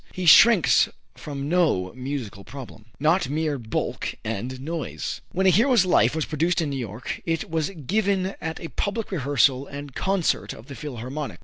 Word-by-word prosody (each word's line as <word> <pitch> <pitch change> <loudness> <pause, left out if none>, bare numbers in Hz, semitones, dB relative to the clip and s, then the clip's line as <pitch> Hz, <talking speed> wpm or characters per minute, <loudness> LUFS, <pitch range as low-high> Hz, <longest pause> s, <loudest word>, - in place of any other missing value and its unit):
He 185 - -4
shrinks 195 +3 +7 0.2
from 140 -1 -6
no 150 - +1
musical 125 -6 -5
problem. 120 -2 -10
Not 155 0 +2
Mere 150 -1 -1
Bulk 110 -2 -3
and 115 +4 -4
Noise. 160 +3 -4
When 190 +1 0
"A 190 - +7
Hero's 230 0 +4
Life" 180 - +3
was 160 - 0
produced 165 +3 0
in 155 -4 -1
New 135 - -3
York 115 -1 -5
it 165 -1 -2
was 160 0 0
given 195 - -1
at 160 0 -4
a 165 - -7
public 215 +1 -3
rehearsal 140 - +2
and 140 -1 -8
concert 190 +1 0
of 110 - -12
the 140 - -9
Philharmonic. 135 +1 -6
150 Hz, 170 wpm, -24 LUFS, 130-180 Hz, 0.2 s, shrinks